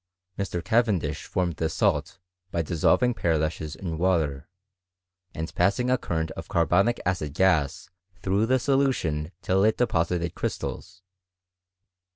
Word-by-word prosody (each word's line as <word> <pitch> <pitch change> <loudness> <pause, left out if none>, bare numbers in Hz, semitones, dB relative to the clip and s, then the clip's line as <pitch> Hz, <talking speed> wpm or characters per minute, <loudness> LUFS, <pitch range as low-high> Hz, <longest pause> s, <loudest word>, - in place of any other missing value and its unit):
Mr. 90 -3 -3
Cavendish 100 -10 +1
formed 90 -4 -1
the 80 - 0
salt - - 0 0.3
by 85 -2 -1
dissolving 90 - +2
pearlashes 80 -4 -1
in 80 -4 -5
Tfater, 80 -7 +1 0.9
and 80 +1 -4
passing 125 +6 +2
a 130 - +4
current 80 -1 -2
of - - -8
carbonic 90 +8 +2
acid 75 -6 -1
.gas 85 -4 +2 0.4
through 100 +4 +1
the 130 +2 +4
solution 125 - 0
till 95 +1 +2
it 110 +1 +3
deposited 85 -6 0
crystals. 95 0 -5
90 Hz, 125 wpm, -26 LUFS, 80-100 Hz, 0.9 s, a